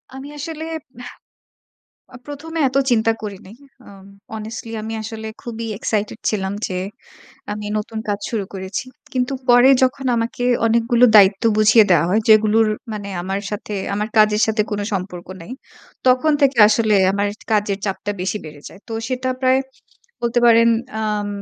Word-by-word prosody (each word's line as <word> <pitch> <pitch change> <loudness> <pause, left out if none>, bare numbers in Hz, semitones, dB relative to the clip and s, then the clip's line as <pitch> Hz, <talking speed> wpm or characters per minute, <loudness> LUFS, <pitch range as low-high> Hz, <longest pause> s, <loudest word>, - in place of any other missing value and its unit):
আমি 270 +2 -8
আসলে 315 +2 -6 0.4
এহ 245 - -8 1.1
অ - - -8
১মে 320 +3 -7
এত 265 - -5
চিন্তা 225 -1 +3
করি 205 -2 -5
নাই। 215 +4 -13 0.3
আম 195 -1 -14 0.3
honestly 220 +1 -7
আমি 220 +1 -5
আসলে 220 0 -7 0.2
খুবই 230 -1 -6
excited 215 0 -2
ছিলাম 195 -2 -2
যে 185 - -5 0.8
আমি 210 0 -6
নতুন 220 +1 -5
কাজ 205 0 0
শুরু 215 -4 -2
করেছি। 190 +4 -4 0.3
কিন্তু 255 +1 -1 0.2
পরে 245 +2 +7
যখন 260 +1 +1
আমাকে 230 +2 -2 0.2
অনেকগুলো 235 +2 +3
দায়িত্ব 195 +1 +6
বুঝিয়ে 215 +1 +6
দেওয়া 170 -3 +4
হয় 215 +3 +3
যেগুলোর 220 0 +5 0.3
মানে 205 -1 -6
আমার 195 +2 -3
সাথে, 210 0 -5 0.2
আমার 210 +2 -2
কাজের 215 0 +4
সাথে 220 -1 +1
কোন 205 0 -2
সম্পর্ক 180 -2 -4
নাই। 170 - -11 0.6
তখন 255 +5 +4
থেকে 275 -2 +3
আসলে 215 -1 +2 0.2
আমার 200 +1 0
এট - - -20
কাজের 205 -2 +1
চাপটা 200 +1 -3
বেশি 195 +3 -2
বেড়ে 150 -2 -11
যায়। 195 - -16
তো - - -6 0.2
সেটা 255 0 -2
প্রায় 260 0 +3 0.6
বলতে 235 +1 +1
পারেন 230 0 +6 0.3
আম 210 -1 -2
220 Hz, 160 wpm, -20 LUFS, 205-240 Hz, 1.1 s, পরে